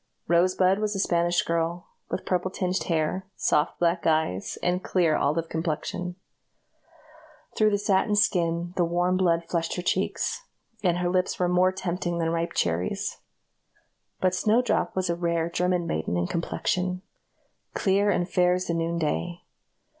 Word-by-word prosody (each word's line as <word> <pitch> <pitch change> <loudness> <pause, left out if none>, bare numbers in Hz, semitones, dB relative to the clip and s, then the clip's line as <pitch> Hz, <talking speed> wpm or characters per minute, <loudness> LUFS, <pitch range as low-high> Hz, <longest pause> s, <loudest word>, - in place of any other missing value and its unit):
Rosebud 185 +3 +3
was 210 -1 -1
a - - -2
Spanish 175 -2 +2
girl, 170 +1 -1 0.2
with - - -4
purple 180 0 0
tinged 185 -2 -2
hair, 165 +3 -1
soft 150 - +1
black 170 0 +1
eyes, 155 - 0
and 180 +1 0
clear 170 -4 +2
olive 160 +3 0
complexion. 165 +2 -3 1.4
Through 215 -1 +4
the 205 - +1
satin 200 +1 +1
skin 175 -3 +1
the 180 - +3
warm 175 +2 +1
blood 170 -2 +2
flushed 165 -1 -1
her 180 - -4
cheeks, 340 - -1 0.4
and 175 -3 +2
her 175 0 0
lips 185 0 0
were 180 - +1
more 180 +1 +3
tempting 175 -2 -3
than 165 -1 0
ripe 170 0 -1
cherries; 85 +3 -1 1.0
but 185 -1 +2
Snowdrop 220 +6 +1
was 185 -1 0
a 170 - 0
rare 170 -1 -1
German 180 0 0
maiden 80 - -2
in 85 - +1
complexion, 180 - -2 0.7
clear 200 +1 +2
and 175 -3 +1
fair 180 0 +3
as 185 0 -2
the 170 - -1
noonday. 170 +1 -1
175 Hz, 150 wpm, -26 LUFS, 170-185 Hz, 1.4 s, Through